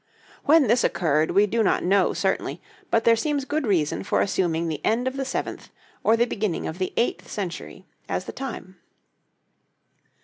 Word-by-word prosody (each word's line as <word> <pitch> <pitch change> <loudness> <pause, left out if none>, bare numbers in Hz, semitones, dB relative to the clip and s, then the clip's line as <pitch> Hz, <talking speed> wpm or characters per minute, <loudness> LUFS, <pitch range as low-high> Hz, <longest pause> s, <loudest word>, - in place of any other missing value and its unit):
When 310 0 +6
this 235 +2 +3
occurred 155 -2 +1
we 200 +1 +4
do 225 +3 0
not 210 - +2
know 195 +1 +3
certainly, - - -1 0.3
but 230 - +2
there 230 - +5
seems 285 +3 -1
good 295 -2 -1
reason 165 -7 +1
for - - 0
assuming 170 -4 0
the 155 -2 -4
end 235 +4 +1
of 260 - -2
the 270 - -2
seventh 265 - -4 0.3
or 225 - +4
the 235 - +3
beginning 210 -7 -2
of 160 +4 -6
the 185 - -1
eighth 235 - 0
century 185 -5 -6 0.2
as - - -2
the - - -6
time. 220 -8 -7
210 Hz, 175 wpm, -24 LUFS, 180-245 Hz, 0.3 s, When